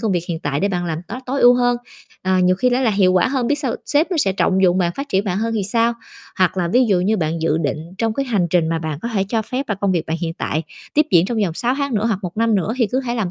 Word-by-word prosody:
công 220 -3 0
việc 175 -2 -1
hiện 165 -2 -2
tại 145 0 -2
để 200 - +1
bạn 180 -2 -2
làm 160 -2 -2
tốt 240 - -5
tối 270 +2 -1
ưu 245 0 +7
hơn, 245 0 +2 0.5
ờ, 185 0 +1
nhiều 185 0 +3
khi 250 +6 +2
nó 245 +1 +1
là 245 -4 +2
hiệu 195 -3 +3
quả 185 +6 +3
hơn, 260 -2 -1
biết 290 +4 +1
sau 265 -5 -2
sếp 300 +5 +1
nó 360 - 0
sẽ 200 -11 +2
trọng 190 0 +1
dụng 180 0 +4
bạn, 175 -2 +1
phát 275 +1 -5
triển 195 -3 +1
bạn 190 -2 -1
hơn 225 +1 -1
thì 215 - 0
sao? 230 +3 +1 0.5
Hoặc 185 0 +2
là 175 -2 0
ví 245 +7 +3
dụ 195 -5 +2
như 205 +4 +1
bạn 160 -2 -2
dự 160 -1 +1
định 145 -3 -1 0.2
trong 225 -1 0
cái 275 +2 -2
hành 205 -8 +1
trình 170 -2 +2
mà 165 0 0
bạn 155 -2 -4
có 235 - -2
thể 195 -2 +1
cho 225 0 0
phép 255 +5 -4
là 210 - 0
công 195 0 0
việc 170 -3 -1
bạn 160 - -2
hiện 165 -2 -3
tại 155 0 -2 0.3
tiếp 300 +1 +4
diễn 175 0 +5
trong 230 +1 -2
vòng 170 -4 -3
6 245 +8 0
tháng 280 -3 -2
nữa 215 +1 +1
hoặc 215 -5 0
1 180 0 -6
năm 225 0 +2
nữa 200 +2 0
thì 240 -3 +2
cứ 255 +6 -1
hãy 245 -2 -3
làm 205 -6 -1
200 Hz, 325 wpm, -20 LUFS, 175-245 Hz, 0.5 s, ưu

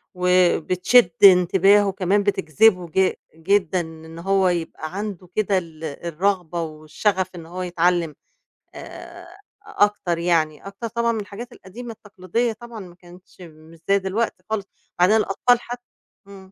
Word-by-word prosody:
وبتشد 180 +3 +3
انتباهه 195 +2 +6
كمان 195 +2 +1
بتجذبه 190 -1 +2
ج 185 +3 +1 0.2
جدًا 185 +1 +1
إن 160 0 -11
هو 195 +1 +2
يبقى 165 -1 -4
عنده 200 -3 -5
كده 205 -2 +1
ال 165 -3 -7
الرغبة 170 +3 -2
والشغف 165 +5 -2
إن 170 -2 -9
هو 180 +3 -7
يتعلّم، 175 -3 0 0.6
آآ 345 0 -11 0.4
أكتر 205 -4 0
يعني، 165 -1 0
أكتر 200 +4 -6
طبعًا 235 +1 0
من 225 -2 -2
الحاجات 210 +5 -9
القديمة 235 +4 -10
التقليدية 210 +3 -3
طبعًا 235 +1 -11
ما 180 -3 -11
كانتش 180 +1 -18
مش 160 -1 -15
زي 200 0 +4
دلوقتي 190 0 -3
خالص، 215 -2 -2 0.3
وبعدين 185 +5 +5
الأطفال 235 +4 +2
حت 245 +1 -7 0.5
إمم. 190 -1 -14
185 Hz, 135 wpm, -22 LUFS, 170-205 Hz, 0.6 s, انتباهه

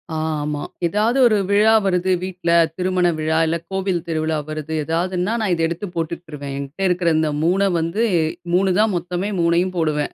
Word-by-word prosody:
ஆமா. 150 -2 -2 0.2
ஏதாவது 215 +8 +1
ஒரு 215 -2 +3
விழா 210 +2 +5
வருது 185 -1 +1
வீட்ல, 185 -2 -4 0.3
திருமண 185 -1 +1
விழா, 160 +1 0
இல்ல 165 +1 0
கோவில் 190 -3 -1
திருவிழா 160 -1 -1
வருது 155 0 -5
ஏதாதுன்னா, 180 +5 -1
நான் 200 -4 +1
இதை 165 -1 +1
எடுத்து 170 +5 -4
போட்டுட்ருவேன். 160 -4 -5
என்ட்ட 145 +8 -3
இருக்குற 180 -1 +1
இந்த 155 -1 +1
3 195 +4 +2
வந்து 165 +8 -1 0.5
3 190 +1 +3
தான் 215 -1 +3
மொத்தமே, 175 +3 -3
3யும் 170 +2 +1
போடுவேன். 155 -3 0
175 Hz, 160 wpm, -20 LUFS, 160-190 Hz, 0.5 s, விழா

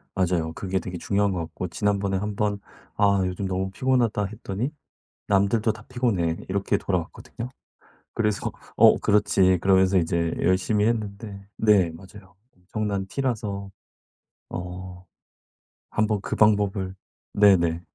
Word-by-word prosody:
맞아요. 85 -3 0
그게 95 +2 -2
되게 90 0 -6
중요한 100 +3 +1
것 90 - -2
같고 85 +2 -5
지난번에 100 +1 0
한번 105 0 -1 0.4
"아 100 -1 +3
요즘 90 +2 -3
너무 95 +1 -2
피곤하다." 120 -3 +1
했더니 110 +5 -4 0.6
"남들도 105 +3 +2
다 105 +1 -13
피곤해." 100 -10 0
이렇게 100 +2 0
돌아왔거든요. 100 +6 -4 0.7
그래서 105 -3 0 0.3
"어 - - +7
그렇지." 100 -3 +3
그러면서 95 0 +4
이제 85 0 0
열심히 100 +4 +2
했는데 100 -3 -3
네 100 -6 +4
맞아요. 95 +3 -14 0.2
엄청난 100 +2 -3
T라서 105 -5 -3 0.8
어 90 +1 -7 0.9
한번 105 -1 +1
그 - - -3
방법을 100 -3 +2 0.4
네네. 85 -5 +4
100 Hz, 285 characters per minute, -25 LUFS, 95-105 Hz, 0.9 s, 어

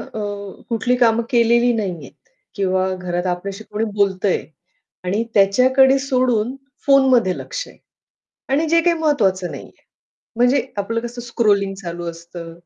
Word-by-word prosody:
अ, - - -8 0.5
कुठली 245 +2 0
कामं 235 -1 +3
केलेली 235 0 +4
नाहीहेत 190 -7 -4 0.4
किंवा 190 -1 0
घरात 180 0 -3
आपल्याशी 195 +4 -4
कोणी 215 +2 -1
बोलतंय 200 -1 +1 0.6
आणि 200 +5 0
त्याच्याकडे 260 +7 +4
सोडून 255 -3 0 0.3
फोनमध्ये 260 -8 +4
लक्ष - - -5
आहे - - -17 0.7
आणि 295 +4 +1
जे 335 +1 +4
काही 340 0 +2
महत्वाचं 195 - +1
नाहीये. - - -9 0.7
म्हणजे 245 +2 +3 0.2
आपलं 230 +3 -1
कसं 240 +1 -7
स्क्रॉलिंग 205 -5 +1
चालू 175 -2 -7
असतं, 170 0 -10
225 Hz, 130 wpm, -20 LUFS, 190-255 Hz, 0.7 s, केलेली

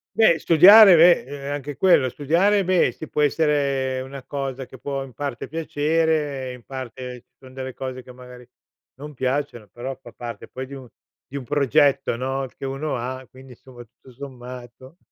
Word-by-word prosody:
Beh, 220 -7 +5
studiare, 185 +5 +8
beh, 170 +2 +6
e 135 - -10
ehm, - - -3
anche 145 0 -6
quello; 175 -4 +4
studiare, 175 - +1
beh, 185 -1 +2
sì 155 - -9
può 150 - 0
essere 140 -3 0
una 135 +1 -8
cosa 135 -1 -5
che 130 - -13
può, 140 +1 -4
in 135 -2 -12
parte 140 0 -5
piacere, 155 -3 -1
e - - -6
in 125 -1 -13
parte 125 -1 -8
ci - - -51
son 130 -1 -15
delle 130 -1 -6
cose 130 -1 -7
che 125 - -13
magari 125 -1 -13 0.5
non 150 0 -9
piacciono, 130 -3 -3
però 125 +5 -6
fa 120 - -13
parte 120 -1 -8
poi 130 +1 -7
di 140 - -9
un 130 -2 -11 0.4
di 140 - -12
un 135 - -5
progetto, 140 -1 +2
no, 135 +2 -3
che - - -13
uno 135 +3 -3
ha, 130 +2 -5
quindi 130 0 -15
insomma, 120 0 -14
tutto 125 +3 -20
sommato 125 +2 -11
135 Hz, 185 wpm, -22 LUFS, 130-150 Hz, 0.5 s, studiare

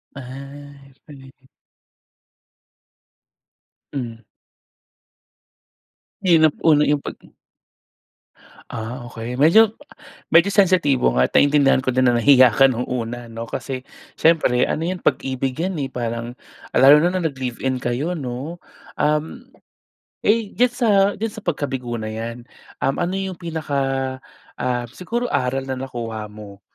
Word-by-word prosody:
Ay, 140 +1 -11
'yon 135 - -29
pala 140 -3 -13
'yon. 130 0 -19 2.5
Mm. 120 -4 -5 2.0
Mahirap 165 -5 +4
una 150 -2 +4
'yung 145 -1 +1
pag - - -7 1.5
ah 120 +2 -6
okey, 115 +1 -6
medyo 200 - +5 0.6
medyo 185 +5 +4
sensitibo 175 - +3
nga 65 - +4
at - - -19
naintindihan 140 -2 +4
ko 130 - 0
din 130 +1 +2
na 120 - +4
nahiya 125 -1 +6
ka 135 -1 +5
nung 125 0 -3
una 120 -1 -4
'no 115 0 -7
kasi, 130 -2 -5 0.3
siyempre 155 -7 +3
ano 160 - -1
'yan 180 0 -4
pag-ibig 130 0 -1
'yan 185 +3 -1
eh, 135 - -4
parang, 120 0 -4 0.3
lalo 135 +3 +7
na 175 - +3
nung 180 -2 -1
nag 145 - -3
live-in 130 0 -3
kayo 135 +9 -1
'no. 140 +3 -6 0.3
Um, 155 - -1 0.7
eh 220 -1 +2
diyan 245 0 +3
sa 245 -1 0 0.3
diyan 225 - 0
sa 220 -1 -10
pagkabigo 125 -5 -3
na 110 - -4
'yan, 115 +2 -6 0.3
um 135 +1 0
ano 175 +1 -1
'yung 190 -2 -4
pinaka, 140 -6 -2 0.4
ah 125 -1 -2
siguro 230 - -4
aral 135 - -1
na 130 - -2
nakuha 120 -4 -5
mo? 105 -2 -12
135 Hz, 130 wpm, -21 LUFS, 125-160 Hz, 2.5 s, lalo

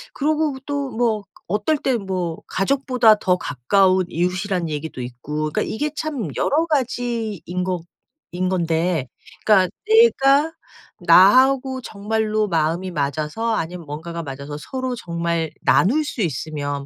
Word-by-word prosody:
그러고 305 0 0
또 285 -1 -2
뭐 225 -4 0 0.2
어떨 210 - 0
때 265 -2 0
뭐 185 -5 -3
'가족보다 250 +1 +3
더 180 -2 +2
가까운 185 +8 +2
이웃.'이라는 180 +1 -1
얘기도 150 -3 -5
있고 150 +5 -4
그러니까 - - 0
이게 295 +7 -2
참 290 - -3
여러가지인 240 - -1
거 180 -2 -2 0.5
인 185 +1 -1
건데 165 -4 0 0.4
그러니까 190 -4 +5 0.2
내가 320 -10 +5 0.5
'나하고 260 +6 +5
정말로 215 0 -1
마음이 170 +3 0
맞아서 155 +9 -1
아니면 170 -2 -4
뭔가가 165 +3 -6
맞아서 140 0 -7
서로 260 - -4
정말 170 -5 -2
나눌 275 +12 +3
수 270 -6 -4
있으면 145 -3 -3
190 Hz, 285 characters per minute, -21 LUFS, 165-250 Hz, 0.5 s, 그러니까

